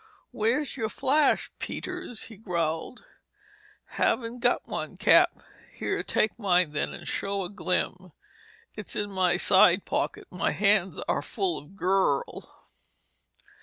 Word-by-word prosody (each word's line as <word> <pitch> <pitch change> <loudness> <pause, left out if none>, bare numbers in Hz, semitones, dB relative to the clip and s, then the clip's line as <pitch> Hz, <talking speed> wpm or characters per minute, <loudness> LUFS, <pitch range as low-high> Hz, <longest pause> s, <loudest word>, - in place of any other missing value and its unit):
"Where's 240 +6 0
your 220 -1 -1
flash, 290 +6 +2
Peters?" 360 -11 -5
he 225 - -9
growled. 170 0 -3 0.8
"Haven't 240 0 -1
got - - +1
one, - - -5
Cap." - - +6 0.4
"Here—take 220 +2 -1
mine, 180 -6 +2
then, 150 - -2
and - - -9
show 200 0 -2
a 175 - -5
glim. 185 -2 -2 0.6
It's 210 - -7
in 205 -1 -2
my 185 -2 +2
side 185 -1 +5
pocket. - - -2
My 180 -2 -1
hands 200 -2 +2
are - - +1
full 380 -3 -2
of 165 +7 -16
girl!" 190 -7 -1
200 Hz, 125 wpm, -27 LUFS, 180-230 Hz, 0.8 s, Cap